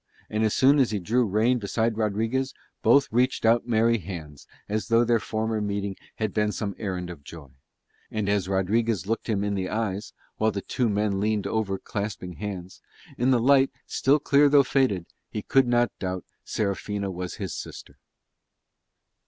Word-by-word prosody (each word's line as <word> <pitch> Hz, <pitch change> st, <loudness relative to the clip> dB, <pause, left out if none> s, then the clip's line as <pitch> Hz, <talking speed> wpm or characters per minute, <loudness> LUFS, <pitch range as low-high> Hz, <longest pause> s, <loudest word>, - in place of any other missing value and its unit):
And 110 Hz, +1 st, 0 dB
as 110 Hz, -, +1 dB
soon 140 Hz, +2 st, +5 dB
as 130 Hz, -, +4 dB
he 105 Hz, -, -1 dB
drew 115 Hz, +6 st, +1 dB
rein 110 Hz, +5 st, +2 dB
beside 110 Hz, +2 st, 0 dB
Rodriguez 115 Hz, +5 st, -1 dB, 0.3 s
both 140 Hz, 0 st, +5 dB
reached 125 Hz, +1 st, +1 dB
out 115 Hz, +2 st, +3 dB
merry 115 Hz, 0 st, +3 dB
hands 80 Hz, -6 st, -8 dB, 0.2 s
as 110 Hz, +1 st, -2 dB
though 115 Hz, 0 st, +4 dB
their 120 Hz, -1 st, +3 dB
former 110 Hz, 0 st, -2 dB
meeting 100 Hz, -1 st, -2 dB, 0.2 s
had 110 Hz, -3 st, -2 dB
been 105 Hz, -1 st, +1 dB
some 100 Hz, 0 st, -3 dB
errand 90 Hz, -4 st, -3 dB
of 75 Hz, -5 st, -11 dB
joy. 75 Hz, -1 st, -11 dB, 0.6 s
And 110 Hz, -2 st, -2 dB
as 100 Hz, -2 st, +1 dB
Rodriguez 100 Hz, +1 st, +1 dB
looked 115 Hz, +3 st, -2 dB
him 100 Hz, -2 st, +1 dB
in 105 Hz, 0 st, -1 dB
the 95 Hz, -2 st, -2 dB
eyes, 105 Hz, -1 st, -2 dB, 0.3 s
while 110 Hz, -, +2 dB
the 100 Hz, -2 st, -3 dB
two 125 Hz, -3 st, 0 dB
men 100 Hz, -1 st, 0 dB
leaned 105 Hz, -1 st, 0 dB
over 105 Hz, -3 st, -1 dB
clasping 100 Hz, -3 st, -5 dB
hands, 95 Hz, -3 st, -6 dB, 0.4 s
in 125 Hz, +2 st, +3 dB
light 135 Hz, +2 st, +5 dB, 0.2 s
still 140 Hz, +3 st, +2 dB
clear 145 Hz, 0 st, +4 dB
though 140 Hz, -1 st, +6 dB
faded, 130 Hz, -10 st, +1 dB, 0.2 s
he 105 Hz, -, -5 dB
could 135 Hz, -2 st, +3 dB
not 120 Hz, 0 st, +2 dB
doubt 95 Hz, -2 st, -3 dB, 0.2 s
Serafina 100 Hz, -1 st, -2 dB
was 90 Hz, -1 st, -5 dB
his -, -, -5 dB
sister. -, -, -9 dB
110 Hz, 170 wpm, -26 LUFS, 100-115 Hz, 0.6 s, though